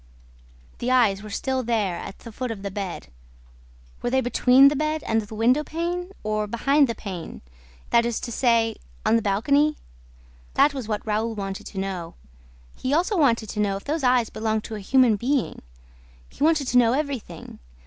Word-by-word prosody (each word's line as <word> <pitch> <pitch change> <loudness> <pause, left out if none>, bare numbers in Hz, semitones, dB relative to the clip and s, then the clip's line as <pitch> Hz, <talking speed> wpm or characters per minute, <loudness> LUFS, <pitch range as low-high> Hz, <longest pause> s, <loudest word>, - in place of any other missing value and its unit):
The 240 - -2
eyes 225 -6 +3
were 215 - -9
still 260 +5 -1
there, 220 -7 0
at 195 - -8
the 230 - -11
foot 250 +3 -4
of 210 -3 -6
the 200 - -4
bed. 190 - -5 0.9
Were 245 - -1
they 265 +2 +2
between 250 +2 +5
the 295 - -2
bed 310 +1 -1
and 225 0 +1
the 215 +1 -9
window 250 +7 +3
pane 350 +4 -3
or 215 0 -1
behind 275 +6 +3
the 230 - -2
pane, 175 - -7 0.5
that 235 - +5
is 235 -1 -1
to 235 - -5
say, 230 -2 +2 0.3
on 215 - +4
the 230 - +3
balcony? 280 +10 +2 0.8
That 290 - +4
was 260 -6 -5
what 210 -2 -3
Raoul 220 +1 -1
wanted 195 -1 -5
to 195 - -10
know. 190 -3 -4 0.6
He 270 +3 -1
also 360 +6 +1
wanted 235 - +2
to - - -5
know 200 -2 +1
if 195 - -11
those 300 +1 -2
eyes 250 -3 +3
belonged 220 -1 -1
to 225 - -6
a - - -5
human 240 +1 +3
being... 255 +3 -1 0.7
He - - -6
wanted 310 -2 +3
to 250 - +5
know 235 -1 +4
everything. 280 -4 -4
230 Hz, 190 wpm, -24 LUFS, 210-275 Hz, 0.9 s, between